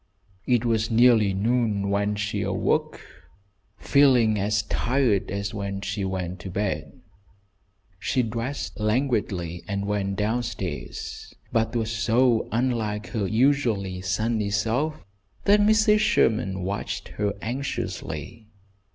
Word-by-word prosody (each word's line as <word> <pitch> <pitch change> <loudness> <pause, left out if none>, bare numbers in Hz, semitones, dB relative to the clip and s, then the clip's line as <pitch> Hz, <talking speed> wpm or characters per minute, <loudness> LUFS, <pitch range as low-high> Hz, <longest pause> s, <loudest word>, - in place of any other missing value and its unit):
It 120 -2 +2
was 115 -1 +1
nearly 115 -3 +5
noon 105 -1 0
when 100 +1 +1
she 105 0 -2
awoke, - - 0 0.8
feeling 125 -7 +4
as 105 +1 +1
tired 120 -4 +1
as 100 +1 -3
when 100 -1 -4
she 100 0 -3
went 95 -1 -3
to 95 - -7
bed. 95 -5 -3 1.0
She 115 +7 +1
dressed 115 +5 -4
languidly 105 -7 -1
and 100 0 -2
went 100 -1 -1
down 110 +4 0
stairs, 115 -3 -6 0.2
but 115 0 0
was 115 -1 -1
so 115 +1 +2
unlike 110 -3 -1
her 105 -5 -1
usually 110 -7 +1
sunny 105 +3 0
self, 120 +9 -1 0.4
that 205 +1 +5
Mrs. 215 0 +4
Sherman 110 - +2
watched 100 +2 -4
her 105 -1 +1
anxiously. 110 - -5
110 Hz, 115 wpm, -25 LUFS, 100-120 Hz, 1.0 s, nearly